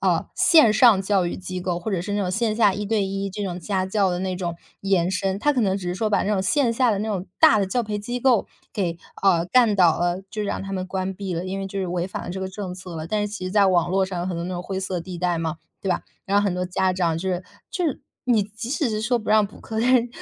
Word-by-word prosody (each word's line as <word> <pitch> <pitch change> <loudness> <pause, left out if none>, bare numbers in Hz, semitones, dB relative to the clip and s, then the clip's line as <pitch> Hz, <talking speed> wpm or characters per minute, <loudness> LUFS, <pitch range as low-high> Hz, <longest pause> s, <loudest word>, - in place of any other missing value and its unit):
呃， - - +1
线 310 -11 +6
上 220 -3 +6
教 195 -2 +2
育 - - -3
机 185 0 -5
构， 175 -1 -2
或 195 +5 -4
者 180 - 0
是 205 +2 -3
那 205 - 0
种 185 - -1
线 215 +2 0
下 210 -4 +5
一 205 +1 -3
对 210 -1 +1
一 195 0 -3
这 205 +1 -4
种 180 -1 -4
家 190 0 -1
教 195 -1 +1
的 175 - -1
那 185 -1 -2
种 175 -2 -3 0.2
延 190 -3 +2
伸， 190 +1 -1
它 295 +6 +2
可 255 - 0
能 195 -2 +2
只 185 -3 -6
是 175 - -1
说 215 +2 -1
把 - - +2
那 210 - 0
种 190 -2 +1
线 245 +3 +2
下 245 0 +3
的 200 - 0
那 215 - -2
种 190 -3 -2
大 215 - +6
的 195 - +1
教 245 +6 0
培 210 -1 -3
机 240 +4 -4
构 245 -3 +3 0.3
给， 175 -6 -2 0.2
呃， 175 -4 +4
干 230 -2 +4
倒 175 -3 +4
了， 175 +1 0
就 215 -2 -3
让 200 - -2
它 195 0 -6
们 185 -1 -2
关 190 0 -3
闭 195 -1 -5
了， 170 +2 -3
因 195 +1 -3
为 195 - -3
就 195 +1 -5
是 190 - -1
违 175 +1 -2
反 - - -6
了 - - -5
这 190 +1 -5
个 190 - -3
政 190 -2 -6
策 180 -2 -8
了， 160 0 -5
但 210 +3 -1
是 205 - -1
其 200 -3 -6
实 185 - -4
在 205 -2 +5
网 175 -2 +3
络 190 0 +2
上 185 -2 -5
有 175 - -2
很 180 - -2
多 170 - -3
那 185 - -4
种 175 - -3
灰 190 +1 -4
色 185 -1 -2
地 175 +1 -7
带 175 -1 0
嘛， 160 0 -2 0.2
对 195 - -4
吧？ 180 - 0 0.2
然 200 +1 0
后 - - 0
很 195 - +1
多 180 0 -1
家 185 +1 0
长 170 -3 0
就 190 +3 -3
是 180 0 -2 0.3
就 360 - -2
是 295 - -1 0.2
你 235 -5 +3
即 215 +3 -7
使 285 -3 0
是 215 - -2
说 240 +3 +1
不 215 - -8
让 215 -1 +5
补 205 - -15
课， 220 0 -5
但 255 +3 +4
是 240 -1 +3
195 Hz, 330 characters per minute, -23 LUFS, 180-215 Hz, 0.3 s, 线